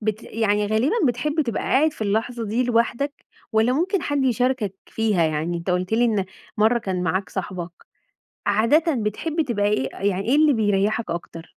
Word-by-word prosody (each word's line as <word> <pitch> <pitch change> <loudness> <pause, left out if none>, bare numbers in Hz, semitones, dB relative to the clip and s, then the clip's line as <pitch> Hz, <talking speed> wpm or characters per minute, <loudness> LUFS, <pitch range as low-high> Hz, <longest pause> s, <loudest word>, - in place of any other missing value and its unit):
بت 215 0 -2
يعني 210 -2 0
غالبًا 220 - +1
بتحب 265 +6 0
تبقى 235 -8 -1
قاعد 305 +3 +2
في 225 - -7
اللحظة 225 +3 -1
دي 225 +4 0
لوحدك، 245 +4 0 0.3
والّا 220 +3 +3
ممكن 360 +8 0
حد 285 -2 0
يشاركك 245 -4 0
فيها؟ 215 -6 +1
يعني 160 +2 -1
أنت 170 +2 -4
قُلت 180 +3 -1
لي 235 +2 +3
إن 215 -5 +1 0.3
مرّة 220 +3 +3
كان 185 -4 -3
معاك 185 -1 -1
صاحبك، 180 0 -4 0.8
عادةً 255 +10 +3
بتحب 250 - -1
تبقى 205 -5 0
إيه 135 -11 0
يعني 195 0 -1
إيه 265 - +4
اللي 300 -1 +5
بيريحك 215 +1 +1
أكتر؟ 165 0 -6
220 Hz, 170 wpm, -23 LUFS, 200-250 Hz, 0.8 s, اللي